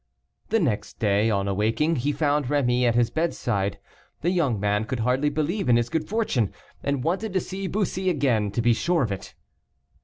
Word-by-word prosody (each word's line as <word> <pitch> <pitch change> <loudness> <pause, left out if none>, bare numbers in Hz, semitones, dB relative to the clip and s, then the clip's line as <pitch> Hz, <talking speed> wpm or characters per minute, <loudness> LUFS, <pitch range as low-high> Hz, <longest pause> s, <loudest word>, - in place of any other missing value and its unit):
The 225 - +3
next 125 - -1
day, 105 +1 +2
on 100 -2 0
awaking, 115 +11 +1
he 140 +4 0
found 145 0 +1
Rémy 125 -3 +2
at 120 -1 +2
his 120 -1 +2
bedside. 120 - -1 0.4
The 175 - +1
young 145 - +1
man 105 +1 +1
could 125 0 -3
hardly 130 +5 +2
believe 155 +5 -1
in 120 - +6
his 120 0 0
good 155 -1 -2
fortune, 195 - 0 0.3
and 140 -2 -1
wanted 190 +6 -1
to 190 - +2
see 190 +1 -5
Bussy 190 -1 -1
again 130 - +1
to 115 - 0
be 120 0 +5
sure 170 +5 +1
of 110 - -2
it. 95 -1 -6
135 Hz, 190 wpm, -25 LUFS, 115-165 Hz, 0.4 s, in